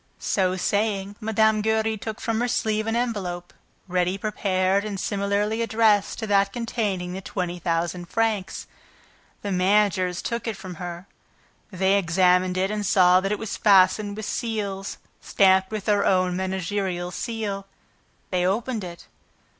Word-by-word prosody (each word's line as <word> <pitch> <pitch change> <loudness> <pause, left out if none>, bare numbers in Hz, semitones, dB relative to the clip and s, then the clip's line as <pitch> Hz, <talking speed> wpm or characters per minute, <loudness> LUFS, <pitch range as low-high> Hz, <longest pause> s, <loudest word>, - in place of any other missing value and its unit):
So 185 -2 0
saying, 200 +1 -1
Mme. 220 0 +2
Giry 220 0 +1
took 220 +2 -6
from 225 -1 -1
her 245 - +1
sleeve 220 -2 0
an 225 - 0
envelope 195 -8 -3 0.3
ready 180 +1 0
prepared 195 -2 0
and 205 -2 -4
similarly 205 +3 -1
addressed 220 -2 +2
to 225 - -4
that 200 -1 +2
containing 205 -6 -2
the 190 - -5
twenty 180 -2 -4
thousand 170 +1 -2
francs. 220 -4 -1 0.8
The 200 - -3
managers 185 -1 +2
took 235 0 -3
it 220 -3 -3
from 185 -3 -9
her. 175 0 -6 0.7
They 190 +1 +2
examined 180 +1 +2
it 190 +2 +1
and 210 -1 -2
saw 180 -2 +5
that 195 +1 -2
it 210 - 0
was 220 +1 -5
fastened 200 +1 +4
with 215 - -5
seals 205 -5 -3 0.2
stamped 190 -1 +3
with 215 -2 -5
their 205 -2 +2
own 185 -1 +2
managerial 185 -1 -2
seal. 205 -2 -4 0.6
They 180 -1 +1
opened 215 +4 -1
it. 170 -1 -9
200 Hz, 145 wpm, -24 LUFS, 185-215 Hz, 0.8 s, saw